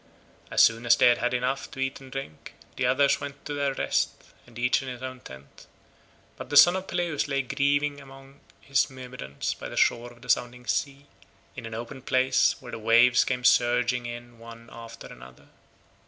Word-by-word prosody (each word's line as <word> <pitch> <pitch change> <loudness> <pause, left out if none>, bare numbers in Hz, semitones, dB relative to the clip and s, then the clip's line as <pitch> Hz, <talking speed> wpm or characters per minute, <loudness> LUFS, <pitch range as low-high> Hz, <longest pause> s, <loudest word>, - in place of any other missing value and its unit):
As - - +4
soon 115 +1 +2
as 115 - +7
they 120 - +5
had 120 - +2
had 125 - 0
enough 125 +2 -2
to - - -11
eat 135 0 -3
and 135 -1 -13
drink, 135 - -8 0.2
the 125 - 0
others 140 +3 +2
went 140 0 -8
to 145 - -4
their 140 -1 -1
rest - - 0 0.5
each 125 +3 +1
in 135 - -8
his 125 0 -7
own 130 0 -6
tent, 65 - -14 0.7
but - - -9
the 145 - +2
son 175 +5 +8
of 190 0 -4
Peleus 175 -5 -2
lay 140 -1 -1
grieving 145 +2 0
among 135 0 -15 0.2
his 135 -2 +1
Myrmidons 125 - -6
by - - -9
the - - -9
shore 120 +1 +1
of 120 -1 -18
the - - -13
sounding 125 0 0
sea, 140 +1 -2 0.5
in 120 -3 -7
an 110 - -7
open 120 +4 -7
place 130 0 +2
where 125 -2 -11
the - - -6
waves 120 +2 +5
came 125 -1 -3
surging 120 0 +2
in 120 0 -9
one 115 0 -13
after 115 0 -11
another. 65 0 -14
125 Hz, 195 wpm, -26 LUFS, 120-135 Hz, 0.7 s, son